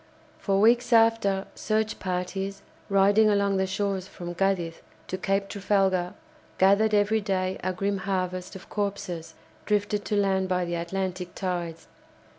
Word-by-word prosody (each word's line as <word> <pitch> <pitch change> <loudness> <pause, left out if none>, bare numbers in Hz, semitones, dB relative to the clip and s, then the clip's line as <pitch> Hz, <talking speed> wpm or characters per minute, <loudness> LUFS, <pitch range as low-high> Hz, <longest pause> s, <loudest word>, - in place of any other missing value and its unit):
For 195 -1 +1
weeks 235 +3 +4
after 225 -4 +4
search 215 0 -1
parties, 190 +1 -3 0.3
riding 200 +2 +5
along 200 -1 +2
the 190 0 +1
shores 190 -1 -2
from 175 -2 -7
Cadiz 175 -3 -1 0.2
to - - -4
Cape 195 +1 0
Trafalgar 195 -3 +1 0.4
gathered 200 +3 +4
every 210 +2 +2
day 190 -2 -1
a 185 - 0
grim 195 +2 -1
harvest 185 -1 -3
of 190 - -10
corpses 195 -5 -4 0.3
drifted 205 0 0
to 210 - -1
land 190 -2 +1
by 180 -1 +1
the 170 - -4
Atlantic 180 +1 -3
tides. 175 -3 -4
195 Hz, 140 wpm, -26 LUFS, 185-205 Hz, 0.4 s, riding